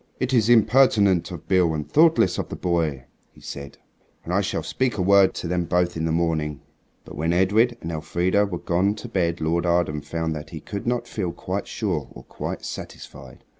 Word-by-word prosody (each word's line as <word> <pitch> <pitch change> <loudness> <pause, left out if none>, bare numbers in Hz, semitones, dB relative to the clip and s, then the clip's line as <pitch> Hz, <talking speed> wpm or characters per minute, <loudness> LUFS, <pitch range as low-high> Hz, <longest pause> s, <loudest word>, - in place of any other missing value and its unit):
"It 130 +1 -1
is 115 -2 +3
impertinent 110 -5 +4
of 85 -4 -9
Beale 90 -4 +3
and 75 -2 -4
thoughtless 155 - +4
of - - -4
the - - -5
boy," 80 -7 -1 0.2
he - - -20
said; 70 0 -8 0.5
"and 85 - -4
I 100 - +3
shall 100 - -2
speak 130 -4 -1
a - - 0
word 100 0 +5
to - - -4
them 90 0 -1
both 90 +1 0
in 80 0 -2
the 80 - 0
morning." 80 -3 -1 0.5
But - - -10
when 80 +3 -1
Edred 105 +7 +3
and 85 - -5
Elfrida 90 +6 0
were 90 -3 -4
gone 90 +5 0
to 105 - -8
bed 85 -2 -1
Lord 85 +2 0
Arden 85 -4 +1
found 80 +1 -3
that 75 +1 -7
he 80 - -7
could 100 +7 -6
not 120 0 -1
feel 95 -5 -3
quite - - -4
sure - - -2
or - - -11
quite - - -6
satisfied. 65 -2 -9
90 Hz, 205 wpm, -23 LUFS, 80-100 Hz, 0.5 s, word